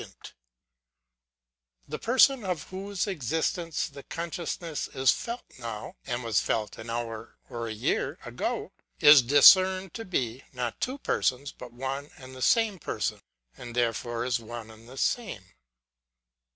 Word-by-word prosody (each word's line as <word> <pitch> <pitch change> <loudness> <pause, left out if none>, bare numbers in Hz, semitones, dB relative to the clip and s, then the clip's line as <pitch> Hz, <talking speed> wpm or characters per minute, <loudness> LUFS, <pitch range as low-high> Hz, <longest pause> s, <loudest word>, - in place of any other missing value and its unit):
The - - -5
person, 260 +1 +4
of 180 -5 -2
whose 195 +1 -3
existence 165 - -1
the 140 -3 -11
con 170 +4 -5
sciousness 165 -3 -4
is 130 0 +5
felt 235 +1 -4 0.2
now, 115 -3 -6
and 120 0 -2
was 115 -2 +2
felt 110 -1 -2
an 110 +1 -8
hour 115 -1 -5
or 115 -1 -4
a - - -4
year 110 - -1
ago, - - -3 0.3
is 145 -2 +9
discerned 185 +8 +6
to 225 - -5
be, 130 - -2
not 125 -2 -4
two 260 +2 -1
persons, 140 - 0
but 125 -1 -11
one 135 +4 -4
and 130 -1 -11
the 130 - -9
same 215 - +3
person; - - -3 0.3
and 120 -1 -9
therefore 120 0 0
is 125 -1 +1
one 115 -1 -8
and 110 +2 -15
the 130 - -11
same. 190 - -1
130 Hz, 145 wpm, -28 LUFS, 120-180 Hz, 0.3 s, is